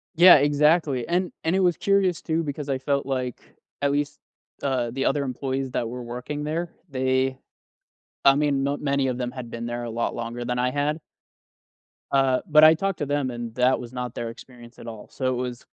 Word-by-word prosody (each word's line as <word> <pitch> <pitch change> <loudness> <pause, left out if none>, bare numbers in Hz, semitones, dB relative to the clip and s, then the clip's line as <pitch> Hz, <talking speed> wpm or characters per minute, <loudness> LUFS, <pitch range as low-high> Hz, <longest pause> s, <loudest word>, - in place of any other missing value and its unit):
Yeah, 175 +3 +9
exactly. 145 -2 +2
And 180 +1 0
and 165 +3 +1
it - - +2
was 180 -3 +2
curious 195 -3 +2
too 165 0 -1
because 145 -1 -5
I 135 - +1
felt 140 +1 -1
like, 130 -2 -3 0.4
at 140 0 +2
least, 145 0 -1 0.4
uh, 125 -4 0
the 135 +2 -2
other 140 +1 +1
employees 135 0 -3
that 120 - -1
were 125 +2 -6
working 125 +5 -5
there, 165 +3 -2 0.2
they 130 0 0 0.9
I 135 - +7
mean, 145 -2 +1
not 140 +1 -1
many 140 -2 +1
of 125 -1 -2
them 125 -1 -2
had 125 -3 -7
been 115 0 -5
there 120 0 -4
a 120 - -5
lot 115 +1 -2
longer 120 +1 -5
than 125 0 -2
I 125 0 +1
had. 145 +3 -1 1.1
Uh, 135 -2 +3
but 155 0 +7
I 155 0 +9
talked 195 +3 -2
to 150 - -1
them, 145 -2 -1
and 120 -1 -6
that 125 +1 +3
was 120 0 -9
not 125 -1 -4
their 115 - -4
experience 120 0 -13
at - - -10
all. 110 -2 -8
So 130 - -3
it 130 -1 0
was 125 -1 -5
135 Hz, 210 wpm, -25 LUFS, 125-150 Hz, 1.1 s, Yeah